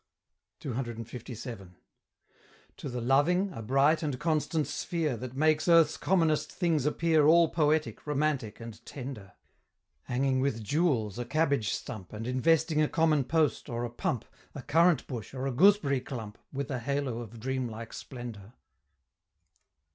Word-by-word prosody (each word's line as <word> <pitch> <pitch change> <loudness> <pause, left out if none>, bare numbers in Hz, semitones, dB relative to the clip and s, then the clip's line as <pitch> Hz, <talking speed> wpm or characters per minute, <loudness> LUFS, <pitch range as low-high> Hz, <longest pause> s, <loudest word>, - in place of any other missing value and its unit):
CCLVII. 120 -4 -6 1.1
To 140 - -6
the 125 -1 -4
loving, 160 +10 +2
a 115 - -7
bright 135 +7 +3
and 145 -5 -2
constant 155 -1 0
sphere, 160 -6 -2
That 125 +2 -7
makes 155 +3 +2
earth's 165 -2 +5
commonest 165 -5 +1
things 160 -6 0
appear 160 -1 +3
All 165 0 +6
poetic, 155 -1 0
romantic, 145 -6 -1
and 115 -1 -10
tender: 125 -8 -8 0.7
Hanging 130 +1 +1
with 130 -5 -1
jewels 120 - 0
a 120 - -3
cabbage 140 -6 +1
stump, 110 -8 -6
And 110 +1 -5
investing 155 +5 +2
a 150 - +2
common 155 -4 +2
post, 155 +1 +1
or 120 0 -2
a 120 - -6
pump, 120 -1 -2 0.3
A 140 - -7
currant 165 -2 +3
bush, 120 0 -7
or 130 +1 -3
a 135 - 0
gooseberry 145 -2 +4
clump, 110 -6 -7
With 140 +1 -4
a 130 - -2
halo 135 -1 -2
of 115 -1 -9
dreamlike 120 -2 -4
splendor. 120 -5 -8
135 Hz, 140 wpm, -29 LUFS, 120-155 Hz, 1.1 s, All